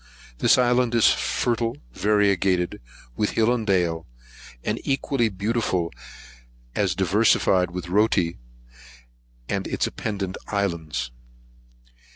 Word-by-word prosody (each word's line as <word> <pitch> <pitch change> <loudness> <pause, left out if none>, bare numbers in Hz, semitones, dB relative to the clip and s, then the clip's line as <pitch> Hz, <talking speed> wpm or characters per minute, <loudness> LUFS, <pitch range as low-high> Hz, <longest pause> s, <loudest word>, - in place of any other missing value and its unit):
This - - +5
island 125 -1 +2
is 115 - +6
fertile, 120 +1 -1 0.2
variegated 100 - +1 0.3
with 105 - 0
hill 115 +2 +3
and 115 -3 -3
dale, 85 -4 +1 0.6
and - - -2
equally 135 -3 0
beautiful 100 -4 -1 0.8
as 95 -4 0
diversified 95 -1 +3
with 90 0 -5
Rotti, 90 - +1 1.1
and - - -2
its - - 0
appendant 100 -3 -4
isles. 80 - -2
100 Hz, 100 wpm, -24 LUFS, 90-115 Hz, 1.1 s, is